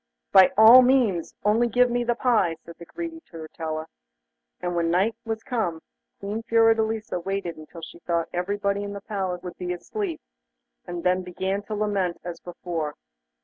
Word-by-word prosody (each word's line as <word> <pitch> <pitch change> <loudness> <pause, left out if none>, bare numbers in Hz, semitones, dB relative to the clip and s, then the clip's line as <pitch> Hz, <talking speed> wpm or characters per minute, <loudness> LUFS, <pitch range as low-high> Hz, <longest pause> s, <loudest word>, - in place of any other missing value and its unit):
'By 190 -1 +7
all 225 +4 +10
means, 245 -10 +2
only 220 +4 +3
give 245 +2 +3
me 245 0 +1
the 240 0 0
pie,' 225 -10 +2
said 170 - -11
the 170 - -11
greedy 330 -1 -6
Turritella. 160 -1 -5 0.7
And 175 -1 -3
when 170 -1 +1
night 190 +6 +2
was 225 0 -3
come, 205 -10 -2 0.4
Queen 205 +3 -4
Fiordelisa 225 -2 +2
waited 190 -1 -3
until 155 +2 -12
she 170 - -10
thought 170 -1 -1
everybody 200 +3 -1
in 205 0 -5
the 200 - -7
palace 190 -4 -3
would 180 -2 -7
be 180 -1 -2
asleep, 180 -1 -4 0.7
and 175 -1 -5
then 180 +1 +2
began 190 +2 -3
to 215 - -3
lament 200 -4 -1
as 175 -1 -6
before. 170 -4 -5
195 Hz, 165 wpm, -25 LUFS, 175-220 Hz, 0.7 s, all